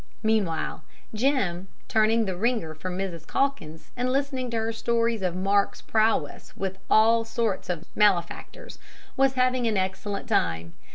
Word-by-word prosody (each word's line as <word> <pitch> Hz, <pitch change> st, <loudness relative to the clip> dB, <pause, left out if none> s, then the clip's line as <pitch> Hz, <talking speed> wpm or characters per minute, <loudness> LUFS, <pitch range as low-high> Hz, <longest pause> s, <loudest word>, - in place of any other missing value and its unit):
Meanwhile 200 Hz, -9 st, 0 dB, 0.3 s
Jim, 215 Hz, -7 st, 0 dB, 0.2 s
turning 220 Hz, +1 st, +3 dB
the 190 Hz, -2 st, -2 dB
wringer 220 Hz, -5 st, -1 dB
for 155 Hz, +4 st, -6 dB
Mrs. 180 Hz, -3 st, -4 dB
Calkins, 165 Hz, -, -2 dB
and 250 Hz, +1 st, -1 dB
listening 265 Hz, -2 st, -1 dB
to 230 Hz, -, -2 dB
her 225 Hz, 0 st, -1 dB
stories 230 Hz, 0 st, 0 dB
of 180 Hz, -2 st, -1 dB
"Mark's" 200 Hz, +2 st, +1 dB
prowess 215 Hz, -9 st, 0 dB
with 190 Hz, 0 st, -4 dB
all 225 Hz, +1 st, +5 dB
sorts 225 Hz, -4 st, -2 dB
of 175 Hz, -1 st, -3 dB
malefactors, 205 Hz, -, 0 dB, 0.4 s
was 270 Hz, 0 st, +3 dB
having 255 Hz, -1 st, +1 dB
an 215 Hz, -3 st, +1 dB
excellent 195 Hz, +3 st, -3 dB
time. 85 Hz, -, 0 dB
215 Hz, 145 wpm, -26 LUFS, 185-235 Hz, 0.4 s, all